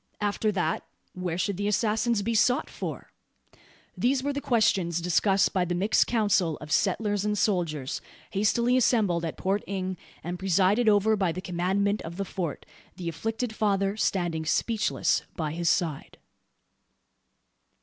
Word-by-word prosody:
After 210 Hz, +1 st, 0 dB
that, 175 Hz, -4 st, -1 dB, 0.3 s
where 180 Hz, -2 st, -3 dB
should 195 Hz, 0 st, -1 dB
the 205 Hz, +1 st, -1 dB
assassins 215 Hz, +1 st, +1 dB
be 230 Hz, +3 st, -1 dB
sought 245 Hz, +3 st, +2 dB
for? -, -, -6 dB, 0.8 s
These 255 Hz, +1 st, +1 dB
were 285 Hz, +1 st, -1 dB
the 285 Hz, -, -3 dB
questions 195 Hz, -9 st, +2 dB
discussed 190 Hz, +3 st, +2 dB
by 185 Hz, -, +2 dB
the 175 Hz, 0 st, -2 dB
mixed 200 Hz, +5 st, +2 dB
council 205 Hz, -8 st, +1 dB
of 150 Hz, 0 st, -10 dB
settlers 205 Hz, +3 st, +1 dB
and 210 Hz, 0 st, 0 dB
soldiers, 165 Hz, -9 st, -1 dB, 0.3 s
hastily 220 Hz, +5 st, +2 dB
assembled 210 Hz, -9 st, +2 dB
at 165 Hz, -, -4 dB
Port 195 Hz, +2 st, 0 dB
Inge, 185 Hz, -2 st, -3 dB, 0.2 s
and 175 Hz, +1 st, -4 dB
presided 195 Hz, +5 st, +3 dB
over 210 Hz, +1 st, +4 dB
by 190 Hz, -4 st, +1 dB
the 180 Hz, -, -5 dB
commandant 190 Hz, +3 st, 0 dB
of 170 Hz, +2 st, -8 dB
the 200 Hz, -, -2 dB
Fort 175 Hz, -4 st, -4 dB, 0.3 s
the 175 Hz, -2 st, -4 dB
afflicted 225 Hz, +6 st, -3 dB
father 200 Hz, -2 st, +1 dB
standing 175 Hz, -6 st, 0 dB
speechless 215 Hz, +7 st, +1 dB
by 155 Hz, -2 st, -2 dB
his 170 Hz, +1 st, 0 dB
side. 160 Hz, -6 st, -1 dB
195 Hz, 150 wpm, -27 LUFS, 175-215 Hz, 0.8 s, over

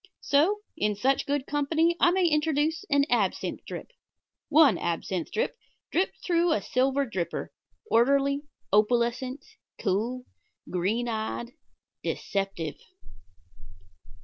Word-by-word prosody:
So, 340 Hz, +9 st, +3 dB
in 210 Hz, 0 st, 0 dB
such 265 Hz, +6 st, +1 dB
good 285 Hz, -1 st, 0 dB
company 315 Hz, +4 st, +1 dB
I -, -, +6 dB
may 365 Hz, +1 st, +2 dB
introduce 310 Hz, +1 st, +1 dB
an 285 Hz, -1 st, +4 dB
absinthe 215 Hz, -6 st, 0 dB
drip -, -, -7 dB, 0.6 s
one 305 Hz, -1 st, +6 dB
absinthe 170 Hz, +1 st, -2 dB
drip, 475 Hz, +3 st, -1 dB, 0.4 s
dripped 370 Hz, +3 st, -1 dB
through 345 Hz, -1 st, +3 dB
a -, -, +1 dB
silver 270 Hz, +2 st, +1 dB
dripper, 190 Hz, -8 st, -3 dB, 0.4 s
orderly, 280 Hz, -, +3 dB, 0.3 s
opalescent, 240 Hz, +5 st, +1 dB, 0.3 s
cool, 230 Hz, +6 st, -1 dB, 0.5 s
green 205 Hz, +7 st, 0 dB
eyed 225 Hz, +1 st, -3 dB, 0.5 s
deceptive. 195 Hz, -6 st, -3 dB
265 Hz, 105 wpm, -27 LUFS, 220-300 Hz, 0.6 s, I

